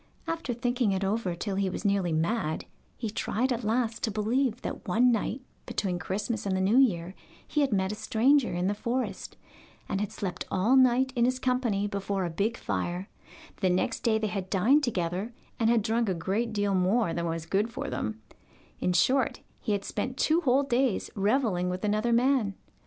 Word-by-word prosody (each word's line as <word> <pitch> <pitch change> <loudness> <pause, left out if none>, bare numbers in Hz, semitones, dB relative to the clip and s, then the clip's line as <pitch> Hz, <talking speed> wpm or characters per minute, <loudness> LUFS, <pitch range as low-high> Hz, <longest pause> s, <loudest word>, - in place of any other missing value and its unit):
After 330 -5 -3
thinking 245 -3 +1
it 190 +1 -1
over 195 -2 -1
till 195 +2 -3
he 195 -1 +1
was 185 - -5
nearly 195 -4 +2
mad, 160 +1 -1 0.3
he 225 -4 -3
tried 250 +4 0
at 240 0 -4
last 225 +1 0
to 225 - 0
believe 230 +3 0
that - - -5
one 240 +7 +4
night 235 +3 -1 0.3
between 180 -3 -2
Christmas 205 +3 -3
and 190 -1 +1
the - - 0
New 200 +7 +4
Year 185 -9 +2 0.3
he 300 - 0
had 275 -3 +2
met 190 -1 +1
a - - -2
stranger 255 +5 +2
in 175 +1 -1
the 200 - +1
forest, 240 +5 -3 0.5
and 195 - -1
had 210 - -2
slept 180 -3 -4
all 210 +8 +2
night 260 0 +4
in 240 -1 +3
his 255 +1 +1
company 250 -6 0
before 200 -2 -2
a 170 - -3
big 210 +7 -1
fire; 180 +2 -3 0.5
the 190 - +1
next 180 +1 0
day 225 -2 +2
they 220 - -1
had 195 -3 -3
dined 235 +10 +4
together, 190 -1 -2 0.3
and 225 -1 +3
had 230 -3 +3
drunk 225 0 +1
a 185 - 0
great 200 +7 -1
deal 205 -2 0
more 190 +1 +2
than 170 0 -2
was 165 -1 -3
good 205 +6 0
for - - -4
them 110 0 -4 0.6
in 180 - +1
short, 255 +9 +2 0.2
he 210 - -1
had 200 -1 -2
spent 255 +5 -3
two 320 +2 +3
whole 270 -2 +3
days 255 -4 0
revelling 200 -4 +1
with 185 +3 -3
another 215 +3 +1
man. 240 -4 +2
215 Hz, 195 wpm, -28 LUFS, 190-245 Hz, 0.6 s, one